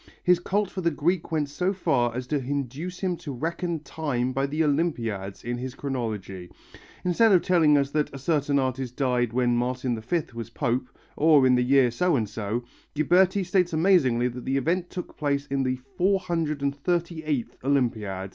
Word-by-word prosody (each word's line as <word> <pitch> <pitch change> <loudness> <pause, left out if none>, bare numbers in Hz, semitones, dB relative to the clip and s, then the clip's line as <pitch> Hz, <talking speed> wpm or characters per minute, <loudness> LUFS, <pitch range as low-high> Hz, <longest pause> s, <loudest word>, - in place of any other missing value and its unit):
His 180 -1 +4
cult 200 +2 -1
for 190 - -4
the 170 - +2
Greek 165 +3 -1
went 155 -2 0
so 180 +7 -1
far 120 -10 +1
as 125 0 -3
to 145 +3 -1
induce 140 +6 -4
him 185 -2 0
to 145 - -7
reckon 165 +4 -3
time 130 -6 -2
by 135 +2 0
the 155 +3 0
Olympiads 115 - -1
in 120 +1 -3
his 130 0 -5
chronology. 105 -9 -4 0.6
Instead 210 +5 +4
of 180 - +5
telling 160 -5 +4
us 140 0 0
that 150 0 0
a 140 - -7
certain 145 0 +1
artist 130 -2 -2
died 125 -4 +1
when 120 0 +2
Martin 125 0 -1
V 155 +9 -1
was 115 0 -6
pope, 125 0 -1 0.3
or 150 -3 +5
in 130 - +5
the 125 - +3
year 130 -1 +4
so 170 +8 +1
and 110 -5 0
so, 110 +3 -3 0.3
Ghiberti 185 +6 +3
states 180 -2 +1
amazingly 155 -9 +3
that 125 0 -6
the 135 +1 0
event 170 +6 0
took 180 - -7
place 140 -1 0
in 140 -1 -1
the 130 -1 -1 0.2
438th 165 - -1
Olympiad! 110 -8 0
140 Hz, 175 wpm, -26 LUFS, 125-170 Hz, 0.6 s, of